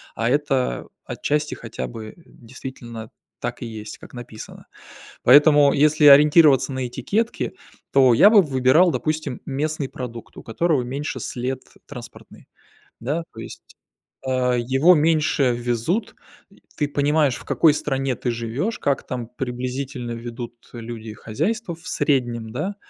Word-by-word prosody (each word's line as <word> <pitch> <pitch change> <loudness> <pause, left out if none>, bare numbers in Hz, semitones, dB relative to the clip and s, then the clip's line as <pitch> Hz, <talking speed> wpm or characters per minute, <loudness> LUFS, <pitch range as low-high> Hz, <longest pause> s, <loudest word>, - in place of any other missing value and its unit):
а 115 +1 0
это 135 - 0 0.2
отчасти 150 +1 -2
хотя 65 - -6
бы 110 - -9
действительно 120 -2 -10 0.3
так - - -4
и - - -4
есть, 110 -2 -8
как - - -14
написано. 120 -3 -10 0.6
Поэтому, 145 +1 +6
если 150 +1 +3
ориентироваться 145 0 +7
на 130 -1 -3
этикетки, 200 - -2 0.4
то 130 -3 +5
я 160 - +7
бы 215 -2 +7
выбирал, 140 +3 +3
допустим, 155 -6 -3
местный 145 0 -3
продукт, 120 -3 -8
у - - -10
которого 145 +3 0
меньше 140 +5 -4
след 130 +1 -4 0.3
транспортный, - - -12 0.5
да. 145 +8 -2
То - - -11
есть, - - -9 0.6
а, 130 -1 +1
его 135 +9 +4
меньше 150 -4 +2
везут. 120 - -2 0.6
Ты 145 - 0
понимаешь 145 -1 +2
в - - -13
какой 160 -3 +4
стране 135 -3 -2
ты 125 - -2
живешь, 120 - -3
как 140 -1 -1
там 125 -2 -4
приблизительно 125 0 -5
ведут 120 0 -7 0.2
люди 115 -2 -7
хозяйства 185 - -3
в 170 +2 -14
среднем, 120 -6 -1
да, 185 - -3
130 Hz, 135 wpm, -22 LUFS, 120-150 Hz, 0.6 s, ориентироваться